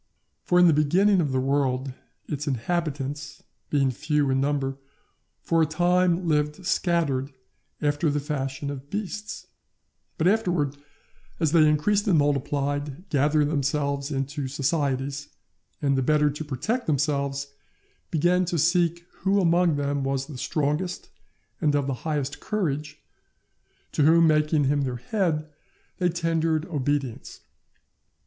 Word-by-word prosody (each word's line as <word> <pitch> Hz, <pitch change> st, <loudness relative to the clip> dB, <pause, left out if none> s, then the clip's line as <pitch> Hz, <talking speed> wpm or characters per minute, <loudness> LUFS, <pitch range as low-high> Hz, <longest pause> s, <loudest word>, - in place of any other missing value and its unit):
For 180 Hz, -, +1 dB
in 180 Hz, -, +7 dB
the 165 Hz, -, +6 dB
beginning 180 Hz, +7 st, +3 dB
of 145 Hz, -4 st, -1 dB
the 130 Hz, -, +1 dB
world, 135 Hz, -1 st, 0 dB, 0.3 s
its 145 Hz, 0 st, -4 dB
inhabitants, 145 Hz, +1 st, -3 dB, 0.3 s
being 135 Hz, -3 st, +2 dB
few 150 Hz, +1 st, 0 dB
in 130 Hz, 0 st, +2 dB
number, 140 Hz, -1 st, -1 dB, 0.6 s
for 165 Hz, 0 st, +2 dB
a 160 Hz, -, +3 dB
time 175 Hz, +2 st, +2 dB
lived 150 Hz, +3 st, 0 dB
scattered 160 Hz, -7 st, 0 dB, 0.5 s
after 145 Hz, +2 st, +1 dB
the 145 Hz, 0 st, 0 dB
fashion 140 Hz, -1 st, -3 dB
of 140 Hz, 0 st, -8 dB
beasts; 210 Hz, +2 st, -5 dB, 0.7 s
but 160 Hz, -, +2 dB
afterwards, 175 Hz, -9 st, +1 dB, 0.6 s
as 160 Hz, -3 st, +1 dB
they 155 Hz, -2 st, +5 dB
increased 200 Hz, +8 st, +1 dB
and 180 Hz, -5 st, +4 dB
multiplied, 145 Hz, +2 st, -1 dB
gathered 150 Hz, +1 st, +2 dB
themselves 140 Hz, -1 st, -1 dB
into 140 Hz, 0 st, -3 dB
societies, 140 Hz, 0 st, -1 dB, 0.5 s
and, 140 Hz, -1 st, +2 dB
the 135 Hz, -, +1 dB
better 150 Hz, +2 st, +3 dB
to 150 Hz, +2 st, -6 dB
protect 155 Hz, -, -2 dB
themselves, 140 Hz, -1 st, -1 dB, 0.6 s
began 175 Hz, +3 st, +2 dB
to 175 Hz, 0 st, -2 dB
seek 170 Hz, +1 st, +2 dB
who 195 Hz, +2 st, +2 dB
among 170 Hz, -2 st, +3 dB
them 140 Hz, -1 st, -1 dB
was 135 Hz, 0 st, -1 dB
the 140 Hz, -3 st, -9 dB
strongest 150 Hz, +6 st, -2 dB, 0.5 s
and 150 Hz, -1 st, +2 dB
of 145 Hz, -1 st, +1 dB
the 135 Hz, -, -1 dB, 0.2 s
highest 145 Hz, -2 st, -2 dB
courage, 150 Hz, -7 st, -3 dB, 0.9 s
to -, -, 0 dB
whom, 165 Hz, +3 st, +6 dB
making 150 Hz, -1 st, +3 dB
him 145 Hz, +1 st, +2 dB
their 130 Hz, -2 st, -2 dB
head, 160 Hz, -, -1 dB, 0.5 s
they 180 Hz, -1 st, +2 dB
tendered 165 Hz, -2 st, 0 dB
obedience. 145 Hz, -5 st, -3 dB
150 Hz, 135 wpm, -25 LUFS, 140-170 Hz, 0.9 s, in